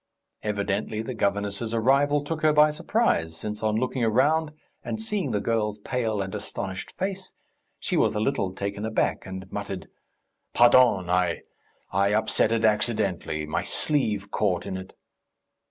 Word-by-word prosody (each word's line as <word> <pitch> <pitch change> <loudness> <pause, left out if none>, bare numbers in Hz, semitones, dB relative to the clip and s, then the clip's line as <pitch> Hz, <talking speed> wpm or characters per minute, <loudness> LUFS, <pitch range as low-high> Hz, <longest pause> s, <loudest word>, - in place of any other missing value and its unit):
Evidently 105 +1 -2
the 130 - -4
governess's 100 +1 -1
arrival 140 +5 +3
took 155 +1 -4
her 155 - +5
by 150 0 +5
surprise, 150 - 0
since, 105 +2 -5
on 110 -1 +1
looking 125 +2 -1
round 145 +8 +2 0.3
and 220 - -4
seeing 210 - -1
the 105 -3 0
girl's 105 -1 0
pale 110 -2 -1
and 95 +1 -7
astonished 100 -2 -6
face, 190 0 -4 0.4
she - - -2
was - - +2
a - - 0
little 105 -5 0
taken 100 +2 -4
aback, 110 -3 0
and 95 0 -6
muttered: 100 -2 -5 0.7
"Pardon. 120 -6 +6
I... 90 -1 +1 0.5
I 100 +2 +2
upset 110 0 +2
it 115 -1 +2
accidentally.... 100 -7 0
My 75 - -1
sleeve 105 -9 -1
caught 90 -5 0
in - - -4
it 95 0 -8
110 Hz, 150 wpm, -26 LUFS, 100-130 Hz, 0.7 s, Pardon